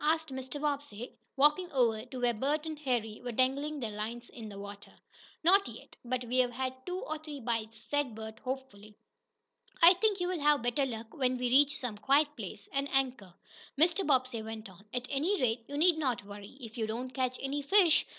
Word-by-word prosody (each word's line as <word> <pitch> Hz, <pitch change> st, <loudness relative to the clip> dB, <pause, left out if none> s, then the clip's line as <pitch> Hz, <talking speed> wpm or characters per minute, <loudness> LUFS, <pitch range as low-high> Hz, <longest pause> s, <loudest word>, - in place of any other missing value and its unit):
asked 320 Hz, +1 st, +2 dB
Mr. 265 Hz, +2 st, -5 dB
Bobbsey, 280 Hz, -6 st, -3 dB, 0.2 s
walking 300 Hz, +6 st, +4 dB
over 230 Hz, -5 st, +2 dB
to 255 Hz, 0 st, -7 dB
where 245 Hz, -1 st, +2 dB
Bert 290 Hz, +7 st, 0 dB
and 310 Hz, -2 st, -5 dB
Harry 240 Hz, -7 st, -1 dB
were 245 Hz, -, -3 dB
dangling 280 Hz, +5 st, +1 dB
their 230 Hz, -4 st, -3 dB
lines 225 Hz, +3 st, -5 dB
in 225 Hz, -3 st, -9 dB
the 200 Hz, -, -9 dB
water. 200 Hz, 0 st, -9 dB, 0.5 s
"Not 390 Hz, +4 st, +5 dB
yet, -, -, -11 dB
but 250 Hz, 0 st, -2 dB
we've 250 Hz, +1 st, +2 dB
had 260 Hz, +1 st, -3 dB
two 360 Hz, 0 st, -2 dB
or 310 Hz, 0 st, -4 dB
three 300 Hz, -2 st, -8 dB
bites," 225 Hz, -2 st, -2 dB
said 290 Hz, -6 st, 0 dB
Bert, 220 Hz, 0 st, -8 dB
hopefully. 250 Hz, -6 st, -6 dB, 0.8 s
"I 340 Hz, +1 st, +9 dB
think 405 Hz, +1 st, +1 dB
you'll 355 Hz, -1 st, -1 dB
have 295 Hz, -3 st, +3 dB
better 255 Hz, +3 st, +1 dB
luck 225 Hz, -2 st, -6 dB
when 255 Hz, -2 st, +1 dB
we 250 Hz, 0 st, 0 dB
reach 290 Hz, +3 st, +5 dB
some 225 Hz, -5 st, -4 dB
quiet 290 Hz, +6 st, +3 dB
place, 205 Hz, -3 st, -7 dB
and 275 Hz, 0 st, 0 dB
anchor," 250 Hz, -9 st, 0 dB, 0.4 s
Mr. 345 Hz, +5 st, +4 dB
Bobbsey 255 Hz, -5 st, +1 dB
went 220 Hz, -2 st, -7 dB
on. 185 Hz, +2 st, -17 dB
"At 250 Hz, 0 st, -3 dB
any 325 Hz, +9 st, +1 dB
rate, 230 Hz, -1 st, 0 dB
you 285 Hz, -, -5 dB
need 330 Hz, +1 st, +4 dB
not 250 Hz, -9 st, -1 dB
worry, 205 Hz, +4 st, -10 dB
if 235 Hz, -1 st, -8 dB
you 220 Hz, -, 0 dB
don't 245 Hz, +4 st, -4 dB
catch 255 Hz, -1 st, -1 dB
any 275 Hz, +2 st, -2 dB
fish. 345 Hz, +2 st, +5 dB
255 Hz, 200 wpm, -31 LUFS, 225-295 Hz, 0.8 s, I